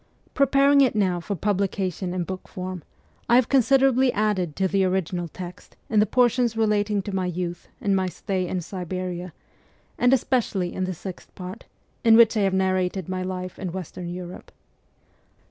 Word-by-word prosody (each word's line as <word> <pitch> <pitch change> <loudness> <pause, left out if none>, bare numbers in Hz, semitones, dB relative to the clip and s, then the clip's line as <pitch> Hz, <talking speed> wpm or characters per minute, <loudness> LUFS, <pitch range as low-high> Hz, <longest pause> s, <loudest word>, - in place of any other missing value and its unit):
Pre 275 - +3
paring 280 +1 +5
it 255 -5 +3
now 185 -4 +1
for 200 +4 -4
publication 190 -1 -1
in 180 -1 -1
book 185 +1 -7
form, 185 -1 -6 0.5
I 235 - +6
have 250 -2 +4
considerably 265 0 +4
added 195 -7 0
to 190 - +1
the 195 +1 +1
original 180 -2 -1
text 175 +2 -10 0.2
in 215 - +4
the 210 - +4
portions 245 0 +2
relating 210 -2 +1
to 200 - -5
my 185 -1 0
youth 175 0 -4
and 200 -1 +1
my 190 -1 +1
stay 185 0 -3
in 180 0 -2
Siberia, 180 0 -5 0.7
and 245 - +4
especially 230 -8 +1
in 185 - -2
the 185 -1 -4
Sixth 185 +2 -8
Part, 185 +5 -8 0.4
in 225 -1 +7
which 230 -1 +6
I - - +2
have 195 -1 +2
narrated 185 -1 0
my 185 0 -2
life 185 0 -5
in 185 -2 -4
Western 180 -1 -6
Europe. 180 0 -8
190 Hz, 175 wpm, -24 LUFS, 180-220 Hz, 0.7 s, in